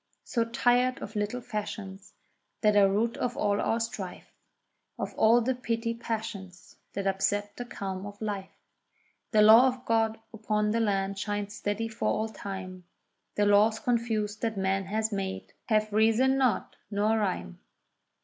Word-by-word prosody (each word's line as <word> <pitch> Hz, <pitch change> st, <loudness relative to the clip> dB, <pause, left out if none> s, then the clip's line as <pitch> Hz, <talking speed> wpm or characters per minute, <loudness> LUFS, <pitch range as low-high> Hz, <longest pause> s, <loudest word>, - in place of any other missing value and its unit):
So 230 Hz, -2 st, 0 dB
tired 245 Hz, +2 st, +2 dB
of 215 Hz, -, -8 dB
little 210 Hz, +4 st, -2 dB
fashions 205 Hz, -3 st, -6 dB, 0.5 s
that 210 Hz, -1 st, +4 dB
are 200 Hz, -1 st, +6 dB
root 225 Hz, +4 st, 0 dB
of 245 Hz, -1 st, -2 dB
all 205 Hz, -1 st, +1 dB
our 225 Hz, -, +1 dB
strife, 210 Hz, -5 st, -6 dB, 0.6 s
Of -, -, -4 dB
all 230 Hz, +2 st, +5 dB
the 260 Hz, +3 st, +1 dB
petty 230 Hz, -2 st, -2 dB
passions 220 Hz, -6 st, -6 dB, 0.2 s
that 200 Hz, -, -3 dB
upset 205 Hz, +1 st, 0 dB
the 245 Hz, -, -6 dB
calm 195 Hz, -4 st, -5 dB
of 205 Hz, 0 st, -10 dB
life. 200 Hz, -3 st, -5 dB, 0.7 s
The 215 Hz, -3 st, +5 dB
law 225 Hz, +4 st, +8 dB
of 255 Hz, 0 st, -3 dB
God 225 Hz, -1 st, +1 dB
upon 210 Hz, -1 st, 0 dB
the 230 Hz, -, +1 dB
land 195 Hz, -2 st, 0 dB
shines 205 Hz, 0 st, -3 dB
steady 210 Hz, +2 st, -2 dB
for 225 Hz, 0 st, -3 dB
all 220 Hz, +1 st, 0 dB
time; 185 Hz, -3 st, -7 dB, 0.5 s
The 205 Hz, -, +2 dB
laws 210 Hz, +2 st, +4 dB
confused 220 Hz, -3 st, -1 dB
that 225 Hz, -3 st, -1 dB
man 195 Hz, 0 st, 0 dB
has 220 Hz, +3 st, -1 dB
made, 195 Hz, -1 st, -4 dB
have 215 Hz, -2 st, +1 dB
reason 225 Hz, +5 st, +4 dB
not 260 Hz, -3 st, 0 dB
nor 215 Hz, +2 st, +1 dB
rhyme. 85 Hz, -, -3 dB
215 Hz, 155 wpm, -28 LUFS, 200-230 Hz, 0.7 s, law